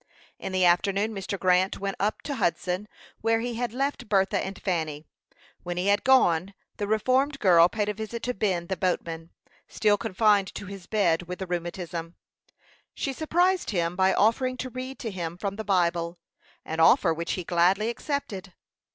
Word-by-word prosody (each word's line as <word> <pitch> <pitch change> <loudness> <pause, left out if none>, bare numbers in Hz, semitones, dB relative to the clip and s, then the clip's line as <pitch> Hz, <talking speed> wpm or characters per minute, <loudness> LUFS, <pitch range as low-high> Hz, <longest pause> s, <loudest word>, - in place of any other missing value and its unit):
In - - -5
the 185 -1 +2
afternoon 195 +5 +2
Mr. 195 0 -4
Grant 185 +1 +2
went 195 0 -3
up 210 +2 -1
to 290 - -3
Hudson, 180 +3 -1 0.3
where 225 0 +2
he 240 +1 -3
had 240 0 -2
left 275 -2 -2
Bertha 195 -2 +2
and 190 0 -6
Fanny. 160 -5 -2 0.6
When 175 0 -5
he 185 +3 +1
had 205 0 +3
gone, 195 -8 +3 0.2
the 205 - -2
reformed 255 +7 +2
girl 175 -6 +6
paid 210 +2 -1
a 210 - 0
visit 220 +2 -6
to 250 - -1
Ben 190 -5 -1
the 190 - -2
boatman, 165 -2 -2 0.4
still 210 -2 +2
confined 205 -1 +2
to - - -6
his 195 -2 -9
bed 175 -5 +1
with 180 0 -5
the 190 - -4
rheumatism. 175 -1 -5 0.8
She 275 - -2
surprised 350 +5 +1
him 175 -3 -1
by 190 +1 +3
offering 255 +4 +2
to 255 0 -5
read 255 +2 -6
to 225 - -3
him 170 -3 -5
from 200 +1 -3
the 220 - -5
Bible 175 -3 0 0.5
an 160 +1 -4
offer 165 +1 +5
which 170 +1 -3
he 180 - -3
gladly 180 +6 +2
accepted. 225 - -4
195 Hz, 175 wpm, -26 LUFS, 175-220 Hz, 0.8 s, girl